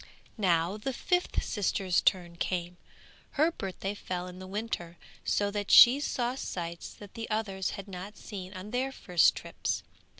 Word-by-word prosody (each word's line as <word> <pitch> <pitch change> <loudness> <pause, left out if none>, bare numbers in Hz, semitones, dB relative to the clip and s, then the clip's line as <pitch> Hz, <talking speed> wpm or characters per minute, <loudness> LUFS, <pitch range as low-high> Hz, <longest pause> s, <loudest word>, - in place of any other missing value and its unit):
Now 175 0 +2
the 260 +5 -3
fifth 360 +8 0
sister's 190 -3 +1
turn 175 -2 +1
came. 175 0 -2 0.6
Her 315 +4 +4
birthday 195 - -4
fell 180 -3 -4
in 180 0 -9
the 185 - -8
winter, 190 -4 -4 0.3
so 205 0 +1
that 205 -1 -3
she 250 +4 +10
saw 250 -4 -1
sights 170 -9 -5
that 205 -1 -12
the 230 0 -6
others 200 -4 -1
had 200 0 -7
not 195 +2 -8
seen 190 -3 -7
on 190 +3 -7
their 255 +2 0
first 180 - +3
trips. - - -3
195 Hz, 160 wpm, -30 LUFS, 180-220 Hz, 0.6 s, she